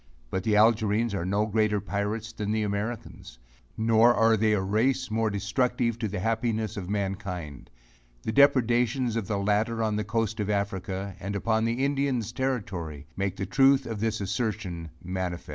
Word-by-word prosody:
But, 95 - -1
the 110 0 +1
Algerines 110 0 +3
are 90 -2 -2
no 100 +3 +1
greater 110 -1 +1
pirates 105 +3 -3
than 105 -2 -4
the 110 0 +1
Americans; 105 - -4 0.4
nor 115 +2 +5
are 115 0 +4
they 110 0 +2
a 105 - +2
race 110 +6 0
more 110 0 +1
destructive 115 +3 0
to 110 - -1
the 105 0 -4
happiness 110 0 -1
to 105 - -4
mankind. 95 -6 -4 0.5
The - - -2
depredations 125 -2 +3
of 115 -5 -2
the 105 - -1
latter 105 +3 +1
on 105 -1 0
the 105 - -1
coast 110 0 -1
of 105 -1 -1
Africa, 100 -1 -2
and 100 +2 -4
upon 110 +2 +1
the 120 +4 0
Indians' 135 -5 0
Territory 95 - -3
make 100 0 -2
the 100 - -3
truth 135 +6 +4
of 110 -2 -4
this 110 0 -1
assertion 100 -5 -3
manifest. 90 -1 -4
110 Hz, 170 wpm, -27 LUFS, 100-115 Hz, 0.5 s, nor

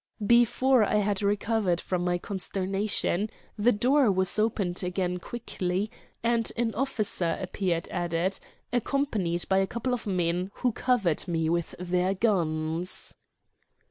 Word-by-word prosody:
Before 240 +2 +4
I 210 - +1
had 205 -1 +1
recovered 205 -2 +1
from 180 -1 -2
my 175 0 +1
consternation 195 +2 -1 0.3
the 230 +3 +3
door 250 +2 +3
was 190 +2 +1
opened 200 -5 0
again 180 0 -1
quickly, 195 -2 -3 0.3
and 230 -1 +2
an 230 -1 0
officer 210 -9 0
appeared 185 -2 -2
at 175 -2 -2
it, 175 +4 0 0.3
accompanied 220 -9 0
by 190 0 +3
a 195 - +1
couple 240 +4 -2
of 240 -3 -3
men, 180 -1 0
who 250 - +1
covered 215 - 0
me 165 -2 0
with 170 -1 -1
their 180 +2 0
guns. 170 -4 -1
195 Hz, 135 wpm, -28 LUFS, 180-225 Hz, 0.3 s, Before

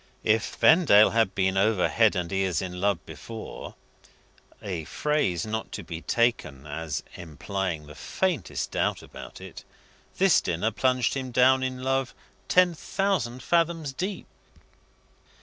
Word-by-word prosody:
If 110 0 +1
Vendale 145 - +6
had 115 -4 +1
been 95 0 +1
over 100 -1 +3
head 110 -3 +3
and 90 -2 -3
ears 95 -3 0
in 90 -1 -5
love 100 -6 0
before 115 -1 -9 0.8
a 90 -5 -5
phrase 130 - -1
not 110 +1 -4
to 100 - -5
be 80 0 -7
taken 100 - 0
as 75 0 -4
implying 85 0 -4
the 75 - -11
faintest 185 - -2
doubt - - -1
about - - -11
it - - -10 0.5
this 195 -1 +4
dinner 90 +7 -1
plunged 125 +1 +1
him 130 -2 -4
down 130 +2 +4
in 130 -1 -3
love 135 0 -1 0.3
ten 180 -1 +4
thousand 160 -9 -2
fathoms 165 -4 0
deep. 190 +7 -4
110 Hz, 135 wpm, -26 LUFS, 90-135 Hz, 0.8 s, Vendale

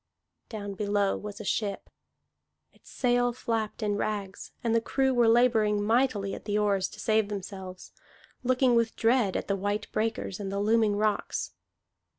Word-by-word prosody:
Down 205 -3 -5
below 205 0 0
was 205 -1 -7
a - - -6
ship; 200 -1 -2 0.9
its - - -20
sail 245 -1 +1
flapped 225 -2 -3
in 205 -1 0
rags, 205 -2 -4
and 230 -1 +1
the 230 - +3
crew 265 +2 +1
were 240 -2 +4
laboring 225 -3 +3
mightily 220 -3 +1
at - - -8
the 205 0 0
oars 200 -2 +1
to - - -13
save 220 -2 +1
themselves, 190 -2 -7 0.5
looking 255 0 +3
with 230 -1 +2
dread 230 -4 +2
at - - -4
the 200 - +1
white 205 +2 -2
breakers 220 -3 -2
and 195 -1 -4
the 200 - -2
looming 215 0 +3
rocks. 210 0 -1
215 Hz, 160 wpm, -28 LUFS, 205-230 Hz, 0.9 s, were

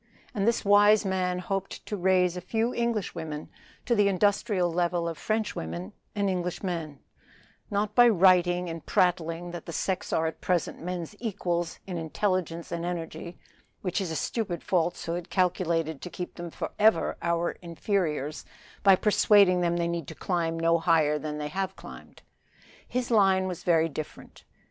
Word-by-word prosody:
And 205 -2 0
this 235 -1 +1
wise 205 +1 +6
man 185 -1 0
hoped 195 +2 -4
to 210 - -3
raise 180 -1 +2
a 180 - -5
few 225 +6 -1
Englishwomen 180 -10 -3 0.4
to 240 - +2
the 205 -3 +4
industrial 200 -2 +1
level 175 0 0
of 165 - -3
Frenchwomen 95 - -3 0.2
and 200 -1 +1
Englishmen; 175 -4 -3 0.7
not 205 +1 -1
by 240 +2 +7
writing 180 -2 +4
and 165 -1 -6
prattling 175 -1 0
that 175 - -8
the - - -4
sex 190 +4 -2
are 160 - +1
at 160 - -4
present 180 -3 -1
men's 180 +2 -5
equals 175 -6 -2
in 180 -3 -4
intelligence 170 0 -2
and 170 -1 -3
energy, 170 -1 -5 0.5
which 185 +1 -1
is 185 - -3
a 160 - -3
stupid 185 -3 -2
falsehood 175 -1 -1
calculated 170 -5 0
to 180 - -6
keep 180 0 -6
them 175 0 -7
forever 210 +3 +1
our 170 0 0
inferiors 165 -4 -2 0.4
by 195 -1 +7
persuading 200 -2 +4
them 175 0 +1
they 170 0 0
need 170 -4 -3
climb 165 -3 -1
no 165 0 +3
higher 155 -3 +3
than 150 0 -4
they 150 0 -4
have 190 +3 -3
climbed. - - -12 0.6
His 250 -1 -2
line 195 -4 +4
was 180 -3 -5
very 165 -2 +3
different. 155 -1 -9
180 Hz, 155 wpm, -27 LUFS, 165-195 Hz, 0.7 s, by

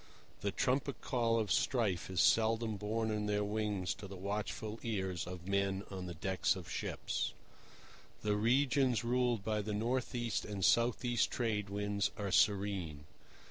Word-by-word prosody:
The 100 - -1
trumpet 130 +6 0
call 115 -2 +1
of 110 -4 0
strife 105 -11 +1
is 95 -2 +2
seldom 110 0 +3
borne 110 +2 -1
on 105 -1 -1
their 105 0 +1
wings 105 -3 -1
to 100 - -9
the 95 - -8
watchful 105 +3 -3
ears 95 -7 -2
of 90 -1 -7
men 100 0 +1
on 95 -2 -5
the 85 - -6
decks 95 +4 +1
of - - -8
ships. - - -2 0.9
The 105 -1 +2
regions 125 +2 +3
ruled 120 -3 +1
by 110 0 0
the 105 0 -3
north 125 +4 -1
east 120 -7 -1
and 100 -3 -2
south 120 +1 +3
east 120 -1 +2
Trade 105 -4 -1
Winds 100 0 0
are 100 -2 -2
serene. 95 -7 +2
105 Hz, 160 wpm, -35 LUFS, 100-115 Hz, 0.9 s, seldom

